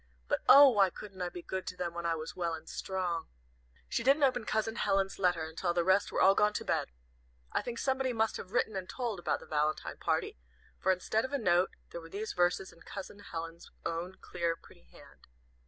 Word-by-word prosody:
"But, -, -, 0 dB
oh, 285 Hz, +1 st, +11 dB
why 200 Hz, -6 st, +4 dB
couldn't 190 Hz, 0 st, -10 dB
I 180 Hz, -, -1 dB
be 175 Hz, 0 st, -8 dB
good 190 Hz, 0 st, -4 dB
to 180 Hz, -, -5 dB
them 175 Hz, -1 st, -3 dB
when 170 Hz, 0 st, -3 dB
I 165 Hz, -, +1 dB
was 155 Hz, 0 st, -6 dB
well 170 Hz, -2 st, -1 dB
and 160 Hz, 0 st, -12 dB
strong!" 180 Hz, -3 st, -3 dB, 0.6 s
She -, -, -1 dB
didn't 275 Hz, +5 st, +4 dB
open 250 Hz, -4 st, +2 dB
Cousin 220 Hz, +1 st, -1 dB
Helen's 195 Hz, -2 st, +1 dB
letter 175 Hz, -3 st, +2 dB
until 170 Hz, +2 st, -2 dB
the 175 Hz, -, +3 dB
rest 190 Hz, +3 st, +3 dB
were -, -, -1 dB
all 195 Hz, -, +7 dB
gone 210 Hz, +1 st, +3 dB
to -, -, -3 dB
bed. -, -, 0 dB, 0.6 s
I -, -, +1 dB
think 240 Hz, -1 st, -5 dB
somebody 265 Hz, -1 st, 0 dB
must 220 Hz, -2 st, +1 dB
have 185 Hz, -, -9 dB
written 220 Hz, -3 st, +1 dB
and 185 Hz, -1 st, -4 dB
told 235 Hz, -7 st, -3 dB
about -, -, -1 dB
the -, -, -11 dB
valentine 155 Hz, 0 st, -1 dB
party, -, -, -1 dB, 0.4 s
for 190 Hz, -, +3 dB
instead 200 Hz, +4 st, 0 dB
of 260 Hz, -, -5 dB
a -, -, +2 dB
note 180 Hz, -6 st, +2 dB, 0.2 s
there 170 Hz, -, -6 dB
were 165 Hz, -, -12 dB
these 210 Hz, +5 st, -4 dB
verses 180 Hz, +2 st, +1 dB
in 170 Hz, -, -20 dB
Cousin 200 Hz, +1 st, -8 dB
Helen's 165 Hz, -3 st, -7 dB, 0.2 s
own 170 Hz, +3 st, -3 dB
clear, 170 Hz, -1 st, -1 dB
pretty -, -, -19 dB
hand. -, -, -18 dB
190 Hz, 220 wpm, -32 LUFS, 170-215 Hz, 0.6 s, oh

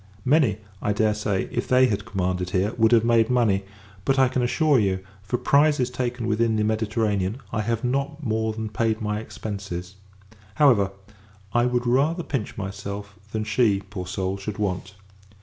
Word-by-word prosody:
Many, 130 Hz, -, +3 dB, 0.2 s
I 105 Hz, -, +1 dB
dare 105 Hz, +1 st, +2 dB
say, 105 Hz, -2 st, -1 dB
if -, -, -2 dB
they 130 Hz, 0 st, +5 dB
had 105 Hz, -6 st, -1 dB
commanded 90 Hz, -4 st, -1 dB
here, 95 Hz, +4 st, 0 dB
would 110 Hz, -1 st, +3 dB
have 115 Hz, -1 st, +5 dB
made 115 Hz, -1 st, +4 dB
money; 110 Hz, -6 st, +2 dB, 0.4 s
but, 135 Hz, +5 st, +1 dB
I 130 Hz, -1 st, +5 dB
can 130 Hz, 0 st, 0 dB
assure 140 Hz, +3 st, +3 dB
you, 95 Hz, -3 st, +1 dB, 0.2 s
for 100 Hz, +5 st, -2 dB
prizes 140 Hz, -3 st, +3 dB
taken 125 Hz, -2 st, -2 dB
within 115 Hz, 0 st, +1 dB
the 105 Hz, -, +1 dB
Mediterranean, 110 Hz, -2 st, 0 dB, 0.2 s
I 105 Hz, -, 0 dB
have 115 Hz, +2 st, -1 dB
not 140 Hz, +4 st, -1 dB
more 110 Hz, -2 st, 0 dB
than 110 Hz, 0 st, -4 dB
paid 110 Hz, 0 st, 0 dB
my 105 Hz, -1 st, -2 dB
expences. 100 Hz, -4 st, -6 dB, 0.6 s
However, 120 Hz, -10 st, +4 dB, 0.6 s
I 120 Hz, +1 st, +3 dB
would 125 Hz, 0 st, 0 dB
rather 145 Hz, +8 st, +2 dB
pinch 135 Hz, -9 st, -4 dB
myself, 100 Hz, 0 st, -6 dB, 0.2 s
than 110 Hz, -1 st, -2 dB
she, 105 Hz, -3 st, +2 dB
poor 90 Hz, -4 st, -5 dB
soul, 95 Hz, +1 st, -2 dB
should 100 Hz, +1 st, -5 dB
want. 95 Hz, -2 st, -3 dB
110 Hz, 170 wpm, -24 LUFS, 100-125 Hz, 0.6 s, they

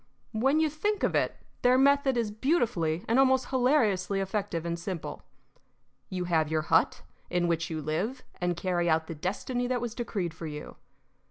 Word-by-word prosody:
When 265 Hz, +7 st, +2 dB
you 320 Hz, -, +4 dB
think 400 Hz, +8 st, -1 dB
of -, -, +2 dB
it, -, -, +1 dB, 0.3 s
their 250 Hz, +1 st, +5 dB
method 280 Hz, -1 st, +4 dB
is 225 Hz, -3 st, 0 dB
beautifully 215 Hz, -, 0 dB
and 230 Hz, +4 st, +3 dB
almost 260 Hz, -1 st, +3 dB
hilariously 225 Hz, -8 st, +2 dB
effective 195 Hz, -3 st, -2 dB
and 170 Hz, 0 st, -2 dB
simple. 175 Hz, -2 st, -5 dB, 0.9 s
You 185 Hz, -1 st, -2 dB
have 160 Hz, -3 st, +1 dB
your 155 Hz, -1 st, 0 dB
hut -, -, +2 dB, 0.3 s
in 175 Hz, -1 st, +1 dB
which 165 Hz, -1 st, 0 dB
you 155 Hz, -2 st, -4 dB
live 205 Hz, -, -2 dB
and 175 Hz, -1 st, -1 dB
carry 175 Hz, -1 st, 0 dB
out 160 Hz, 0 st, +2 dB
the 165 Hz, -, -6 dB
destiny 225 Hz, -, -2 dB
that 250 Hz, 0 st, 0 dB
was 235 Hz, -2 st, -4 dB
decreed 200 Hz, -8 st, -3 dB
for 165 Hz, 0 st, -7 dB
you. 150 Hz, 0 st, -8 dB
195 Hz, 175 wpm, -29 LUFS, 170-255 Hz, 0.9 s, their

